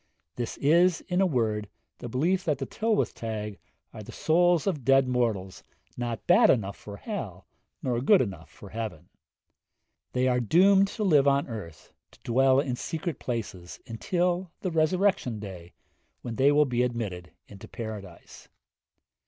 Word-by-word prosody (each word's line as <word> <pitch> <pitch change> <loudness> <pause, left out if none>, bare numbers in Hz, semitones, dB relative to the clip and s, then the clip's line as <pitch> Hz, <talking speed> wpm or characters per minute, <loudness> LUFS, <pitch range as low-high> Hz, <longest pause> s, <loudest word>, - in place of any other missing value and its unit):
This 120 -2 -4
is, 170 +4 +3
in 180 +1 -1
a 190 - +4
word, 110 - -1 0.3
the 120 - -7
belief 175 +10 +1
that 150 -4 +1
the 135 - -4
Tylwyth 220 +5 0
Teg 105 -3 -5 0.3
are 110 - -8
the 105 - -10
souls 175 0 +2
of 155 -9 -1
dead 135 +1 +4
mortals 115 -7 -1 0.3
not 120 -2 -4
bad 180 +7 +6
enough 100 -5 +1
for 100 -1 -10
hell 105 - -6 0.4
nor 120 -2 0
good 195 - +5
enough 95 -8 -4
for 100 - -13
heaven. 110 -6 -6 1.0
They 125 +1 +1
are 125 -1 +2
doomed 190 - +5
to 215 - -4
live 150 -8 +4
on 140 0 +2
earth, 100 - -9 0.2
to - - -20
dwell 130 +2 +3
in 130 -3 -1
secret 160 +2 -4
places, 105 -7 -5
until 175 - -1
the 185 - -2
resurrection 160 - +1
day, 95 -4 -9 0.5
when 120 -2 -5
they 140 +2 +5
will 150 +1 +4
be 125 -2 0
admitted 105 -8 -3
into 100 -2 -12
paradise. 105 -6 -9
125 Hz, 155 wpm, -27 LUFS, 105-165 Hz, 1.0 s, bad